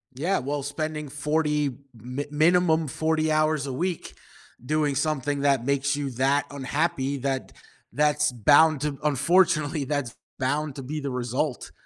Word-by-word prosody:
Yeah, 170 +9 0
well, 140 +2 -3
spending 150 +1 -4
40 150 -2 0 0.2
mi 125 +5 -6
minimum 160 +1 +3
40 155 +3 0
hours 155 -2 +1
a 135 - -4
week 175 +5 -3 0.5
doing 150 +1 0
something 145 -1 -1
that 135 -4 +2
makes 140 +1 +1
you 145 -1 -3
that 135 +4 +1
unhappy, 140 0 -1
that 135 0 -3 0.4
that's 150 0 +2
bound 145 +5 +4
to 150 -2 -2
unfortunately, 155 0 +2
that's 140 -3 -3 0.2
bound 145 +2 -1
to 135 - -7
be 150 +4 -4
the 140 -2 -4
result. 125 +2 -2
145 Hz, 140 wpm, -25 LUFS, 135-155 Hz, 0.5 s, bound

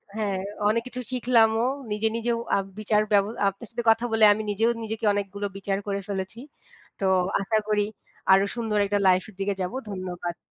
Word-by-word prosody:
হ্যাঁ, 200 -3 -1 0.3
অনেক 230 +2 +2
কিছু 250 0 -5
শিখলাম 240 -3 +4
ও - - +2 0.3
নিজে 210 +1 +2
নিজেও 230 0 0 0.2
আ - - +3 0.2
বিচার 210 0 +2
ব্যব 200 -1 +5 0.2
আপনার 195 +4 -11
সাথে 240 0 -3
কথা 225 +2 +3
বলে 225 -1 +3
আমি 215 +1 -4
নিজেও 225 +3 +2
নিজেকে 220 +1 -3
অনেকগুলো 200 0 -3
বিচার 195 0 -1
করে 200 0 -1
ফেলেছি। 200 +2 -4 0.6
তো 195 - -1 0.4
আশা 220 +3 +1
করি 210 -1 +2 0.5
আরো 195 +1 +6
সুন্দর 225 -3 -1
একটা 205 +1 0
লাইফ 185 0 +4
এর 210 - -16
দিকে 195 +1 0
যাবো। 180 +6 -3
ধন্যবাদ। 180 -3 -5
210 Hz, 185 wpm, -25 LUFS, 195-225 Hz, 0.6 s, আরো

